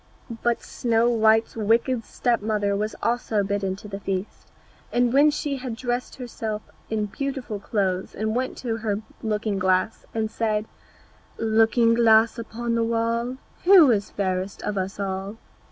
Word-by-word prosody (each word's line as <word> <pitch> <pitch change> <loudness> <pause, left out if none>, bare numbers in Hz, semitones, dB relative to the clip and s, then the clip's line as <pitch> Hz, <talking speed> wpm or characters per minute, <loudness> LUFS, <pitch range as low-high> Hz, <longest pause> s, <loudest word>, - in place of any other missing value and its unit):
But 240 -1 0
Snow 235 0 +1
white's 220 -1 +3
wicked 230 +2 +1
step 240 -3 0
mother 205 -1 0
was 210 +2 -2
also 230 -3 +1
bidden 195 -1 -1
to 205 - -11
the 200 -1 -6
feast, 195 0 -4 0.4
and 245 0 +2
when 285 +3 +6
she 290 -1 -2
had 250 -3 -5
dressed 245 +1 -3
herself 225 -4 -5 0.3
in 215 -1 0
beautiful 255 -1 -4
clothes 190 -3 -1
she 215 - -2
went 245 +4 -1
to 230 -3 -3
her 215 -2 -2 0.2
looking 210 -2 -1
glass 185 +3 +1
and 220 -1 -2
said, 215 -2 0 0.7
"Looking 225 +1 +3
glass 230 0 +4
upon 230 +1 -3
the 230 0 +2
wall, 230 +2 -1 0.3
Who 355 -8 +8
is 205 -3 0
fairest 190 0 -2
of 210 - -2
us 190 +1 -3
all?" 195 +2 -3
220 Hz, 155 wpm, -24 LUFS, 205-235 Hz, 0.7 s, Who